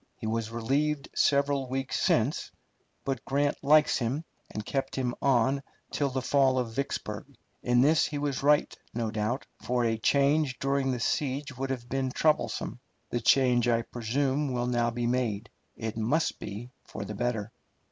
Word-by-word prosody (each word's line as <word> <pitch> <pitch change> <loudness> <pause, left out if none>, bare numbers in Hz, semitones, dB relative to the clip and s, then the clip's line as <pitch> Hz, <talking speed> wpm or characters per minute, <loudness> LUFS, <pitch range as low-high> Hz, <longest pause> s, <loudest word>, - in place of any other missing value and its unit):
He - - -7
was 110 0 -1
relieved 140 +6 0
several 140 -2 +2
weeks 135 0 -2
since, - - +1 0.6
but 135 -3 -2
Grant 140 +1 +1
likes 150 0 +5
him, 135 +7 -2 0.2
and 105 - -5
kept 135 +2 -2
him 125 -2 -1
on 135 +1 +3 0.3
till 140 -1 0
the 130 -1 -3
fall 135 -1 +3
of 120 -3 -1
Vicksburg. 140 +4 -3 0.4
In 120 0 +3
this 155 +3 +4
he 150 - -4
was 145 -2 -1
right, 145 +1 +3 0.2
no 115 -2 -1
doubt, 110 +4 -1 0.2
for 125 -1 0
a 115 -1 0
change 140 +1 +2
during 135 0 0
the 125 -2 -1
siege 140 +3 -1
would 135 +1 -3
have 125 -3 -4
been 130 +1 -1
troublesome. 125 -5 0 0.3
The 120 - -1
change, 125 0 +4
I 115 -1 +2
presume, 130 +5 -1
will 120 -1 -1
now 120 -1 +1
be 120 0 -2
made. 120 -3 -1 0.2
It 110 -1 -4
must 120 +9 0
be 105 +5 -7
for - - -7
the - - -5
better. 115 -3 -2
130 Hz, 165 wpm, -29 LUFS, 120-140 Hz, 0.6 s, likes